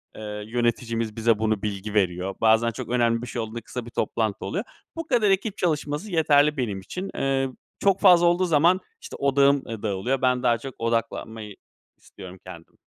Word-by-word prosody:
eee, 105 -1 -6
yöneticimiz 115 -1 -1
bize 115 -1 +2
bunu 110 -2 0
bilgi 105 0 -4
veriyor. 95 -1 0
Bazen 110 +1 +4
çok - - -7
önemli 120 -1 +2
bir 125 - -6
şey 120 0 -4
olduğunda 110 +1 -6
kısa 120 +1 -7
bir 120 - -10
toplantı 110 -3 -2
oluyor. 195 +5 -2 0.3
Bu 330 -1 -5
kadar 235 -7 +3
ekip 195 +2 0
çalışması 155 +2 -2
yeterli 150 -2 +3
benim 105 -7 -2
için, 185 - -6
eee, 135 0 0 0.3
çok 195 -1 +2
fazla 180 -3 +6
olduğu 175 +2 +3
zaman 170 +3 +4 0.2
işte 465 - -9
odağım, 140 0 +3
ııı, 115 -2 -7
dağılıyor. 110 +6 -1
Ben 125 -1 +2
daha 120 -1 +3
çok 130 +2 -9
odaklanmayı 115 -2 -3 0.4
istiyorum 95 0 -12
kendim. 85 -3 -12
120 Hz, 175 wpm, -24 LUFS, 110-150 Hz, 0.4 s, fazla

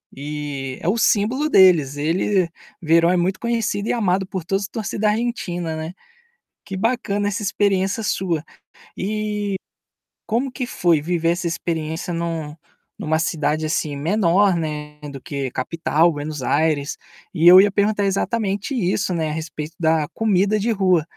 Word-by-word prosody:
e 140 -2 -5
é - - -4
o 200 +6 +2
símbolo 235 +7 +2
deles. 170 - +5
Ele 175 +5 +1 0.3
Veron 165 +1 +4
é 185 - +2
muito 185 +2 0
conhecido 225 -3 -1
e - - +3
amado 195 -4 +1
por 185 -3 -5
todos 195 +3 0
os 200 - -5
torcida 215 -1 -1
Argentina, 180 -8 -2
né. 160 +2 -5 0.7
Que 195 - -7
bacana 205 -2 0
essa 205 +1 -3
experiência 195 +1 +1
sua. 180 -6 -1 0.5
E 210 0 -2 0.7
como 245 +4 -1
que 255 -1 -4
foi 175 -8 +2
viver 165 0 0
essa 175 0 -2
experiência 160 0 -3
em 170 - -2
um 160 -3 -4 0.4
em - - -5
uma 160 +1 +2
cidade 155 -1 0
assim 155 -2 -1
menor, 185 +4 +3
né, 150 -2 -4
do 135 - -8
que 140 0 -4
capital, 165 +4 +1
Buenos 145 -2 -5
Aires? 145 +1 +1 0.4
E 170 -1 +3
eu 185 +2 +11
ia 205 +1 +5
perguntar 205 +1 +1
exatamente 205 +3 -1
isso, 190 -3 0
né, 160 -2 -1
a - - -3
respeito 160 -1 -6
da 160 -2 +2
comida 210 -1 +2
de 225 - -1
rua. 185 -6 +2
180 Hz, 160 wpm, -21 LUFS, 160-205 Hz, 0.7 s, eu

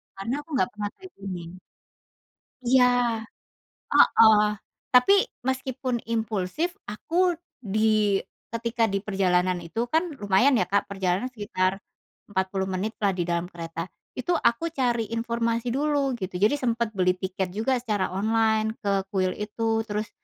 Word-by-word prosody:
karena 195 +5 -3
aku 325 - -29
gak - - +2
pernah 210 -1 -4
kayak 375 -1 -13
gini. 185 -2 -7 1.1
Iya, 250 +1 +5 1.1
heeh. 220 -2 +7 0.5
Tapi 250 +9 +6 0.3
meskipun 260 -2 -2
impulsif, 225 - -1 0.2
aku 345 - +1 0.3
di 215 -1 +2 0.3
ketika 230 +1 0
diperjalanan 185 -3 +1
itu 225 +8 -3
kan 320 - +4 0.2
lumayan 210 +6 +3
ya, 185 - +1
Kak, 200 +2 0
perjalanan 195 +4 -1
sekitar 195 -5 -1 0.5
40 190 0 -1
menit 190 +3 -2
lah 200 -2 +1
di 180 - -1
dalam 170 0 -1
kereta, 165 -1 -6 0.3
itu 345 +8 0
aku 235 -2 +2
cari 240 -5 +1
informasi 230 +1 -1
dulu 280 0 +1
gitu, 185 -2 -5
jadi 215 +7 +5
sempet 235 -3 0
beli 185 0 +3
tiket 185 0 -4
juga 250 +4 +1
secara 210 -6 -1
online 220 +2 +1
ke 195 -2 0
kuil 185 -1 +2
itu 225 +1 -1
terus 210 0 -3
215 Hz, 135 wpm, -26 LUFS, 190-235 Hz, 1.1 s, heeh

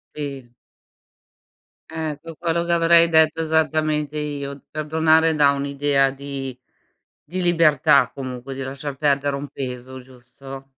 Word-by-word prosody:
Sì. 140 -4 -6 1.4
Eh, 160 -2 -4
qu 165 -1 -10
quello 170 0 -1
che 170 - -3
avrei 170 0 +5
detto 160 0 +3
esattamente 155 -1 0
io. 140 -2 -5
Perdonare 160 +1 +2
dà 145 -2 +5
un'idea 140 0 +1
di 135 -2 -7 0.7
di 185 +2 -3
libertà 165 -7 +4
comunque, 130 0 -6
di 135 - -5
lasciar 135 +1 -6
perdere 140 -1 +1
un 140 +1 -6
peso, 130 0 -7
giusto? 130 +2 -12
145 Hz, 120 wpm, -22 LUFS, 135-160 Hz, 1.4 s, avrei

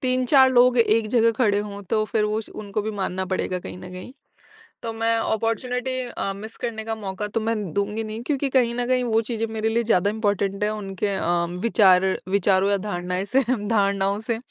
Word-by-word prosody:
3-4 255 +1 +4
लोग 250 0 +5
एक 225 -1 +3
जगह 230 0 +4
खड़े 210 -5 +3
हों, 205 -1 -5
तो 215 +3 0
फिर 215 0 0
वो 210 +1 0
उस 220 - -6
उनको 205 0 -4
भी 220 - -3
मानना 190 0 -2
पड़ेगा 185 0 -2
कहीं 180 - -8
न 180 0 -10
कहीं। 185 +8 -9 0.7
तो 230 -1 -3
मैं 225 0 +1
अपॉर्च्युनिटी 240 +4 -1 0.2
अ, 195 -4 -3
मिस 220 +3 -9
करने 220 -2 -3
का 225 - -2
मौका 205 -1 -5
तो 225 +2 -2
मैं 225 +1 -1 0.2
दूँगी 205 +2 -1
नहीं, 215 +1 -6
क्योंकि 280 +1 -1
कहीं 245 -3 +2
न 245 0 -1
कहीं 255 0 +1
वो 225 -1 +2
चीज़ें 225 -1 -1
मेरे 220 0 -1
लिए 230 +1 +1
ज़्यादा 205 -3 +2
इम्पोर्टेंट 205 -2 -1
हैं, 210 - +1
उनके 200 -1 -3
अ, 175 -1 0
विचार 190 -4 +4 0.2
विचारों 195 0 +2
या 200 - +3
धारणाएँ 180 -2 -3
से 260 +7 +2 0.3
धारणाओं 200 -2 +1
से। 230 +1 -2
215 Hz, 205 wpm, -23 LUFS, 200-230 Hz, 0.7 s, लोग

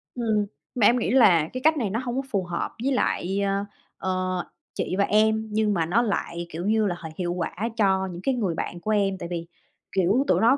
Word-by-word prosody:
Ừm, 220 -4 +1 0.3
mà 235 -5 +3
em 245 +4 +5
nghĩ - - -1
là 185 -12 +5
cái 255 - -4
cách 315 +1 +4
này 230 -7 0
nó 220 +4 -1
hông 245 -1 -3
có 265 - +1
phù 200 -4 +1
hợp 175 -1 -3
với 275 - +1
lại, 195 -6 0
a, 200 0 0 0.3
ờ, 185 -1 -1 0.3
chị - - -2
và 200 - +4
em, 220 +1 +2
nhưng 210 0 +2
mà, 170 -4 +1
nó 190 +8 +2
lại, 175 -6 -2
kiểu 170 +2 -5
như 215 +1 +2
là, 175 - -1
h 165 - -10
hiệu 175 -1 -1
quả 175 -2 -2 0.3
cho 190 -3 +2
những 175 0 -7
cái 270 - +2
người 195 -9 -1
bạn 175 - -4
của 215 +5 -2
em. 200 -2 +2
Tại 170 - -6
vì, 170 -1 -4 0.4
kiểu, 195 +7 +2
tụi - - +3
nó 240 +5 +5
200 Hz, 240 wpm, -25 LUFS, 180-225 Hz, 0.4 s, em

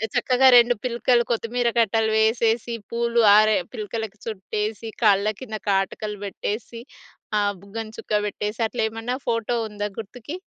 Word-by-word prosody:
చక్కగా 260 +1 +4
2 240 0 +5
పిలకలు 240 0 +2
కొత్తిమీర 235 +1 0
కట్టలు 220 0 +2
వేసేసి, 225 +1 +1 0.2
పూలు 235 0 +1 0.2
ఆరె 215 0 +5 0.2
పిలకలకు 215 0 -5
చుట్టేసి, 215 +2 -4
కళ్ళ 210 +1 +4
కింద 220 -4 -5
కాటుకలు 200 +1 -1
పెట్టేసి, 220 +3 -5 0.6
ఆహ్, 205 0 +1
బుగ్గన 220 +2 -6
చుక్క 210 -1 -1
పెట్టేసి, 210 +2 -4
అట్లేమన్నా 225 +2 -2
ఫోటో 230 +1 0
ఉందా 205 0 -4
గుర్తుకి? 245 - -7
220 Hz, 125 wpm, -23 LUFS, 210-235 Hz, 0.6 s, 2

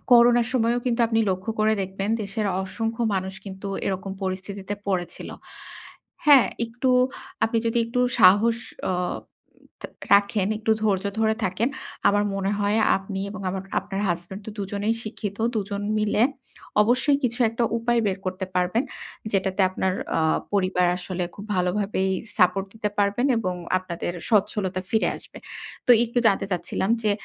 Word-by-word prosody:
করোনার 240 0 +6
সময়েও 240 -1 +2
কিন্তু 240 0 +1
আপনি 225 0 +1
লক্ষ্য 185 +4 -2
করে 215 0 +4
দেখবেন 195 +2 -3
দেশের 210 +1 -2 0.2
অসংখ্য 225 +4 -3
মানুষ 190 0 -2
কিন্তু 195 0 -7 0.2
এরকম 195 0 -2
পরিস্থিতিতে 195 +1 -4
পড়েছিল। 180 -3 -2 1.0
হ্যাঁ 280 -4 +8 0.2
একটু 245 +3 -1 0.5
আপনি 225 +1 +1
যদি 230 +1 +1
একটু 245 +2 -1 0.2
সাহস 205 +5 +6 0.3
অ - - +1 0.6
উম - - -24 0.2
থা - - -5 0.3
রাখেন, 200 -1 +3
একটু 220 0 -1
ধৈর্য 200 -3 +1 0.2
ধরে 220 0 +3
থাকেন। 195 +7 0 0.4
আমার 205 0 +3
মনে 195 0 -1
হয় 205 +2 +1 0.2
আপনি 195 0 -6
এবং 205 -1 -7
আমার 190 0 -4 0.2
আপনার 195 0 -5
হাসব্যান্ড 175 +4 -4
তো - - -5
দুজনেই 205 +3 -1
শিক্ষিত। 210 -2 -5 0.2
দুজন 200 0 -2 0.2
মিলে 210 +1 +2 0.6
অবশ্যই 255 +5 +3
কিছু 245 +1 0
একটা 230 +1 0
উপায় 235 0 +1
বের 195 0 0
করতে 185 0 -3
পারবেন। 180 +7 +1 0.5
যেটাতে 190 0 0
আপনার 185 0 0 0.3
অ - - +2 0.3
পরিবার 185 -2 +2
আসলে 180 0 -3
খুব 200 - -9
ভালোভাবেই 190 +1 0 0.3
সাপোর্ট 185 +1 +3
দিতে 210 -1 -2
পারবেন 205 +6 +2
এবং 185 -5 -1 0.2
আপনাদের 175 -1 -4 0.2
স্বচ্ছলতা 195 -3 +1
ফিরে 220 - +2
আসবে। - - -12 0.5
তো 250 - +3
একটু 240 +1 -2
জানতে 195 -1 +3
চাচ্ছিলাম 190 +3 -1
যে, 215 - +2
200 Hz, 150 wpm, -24 LUFS, 190-225 Hz, 1.0 s, হ্যাঁ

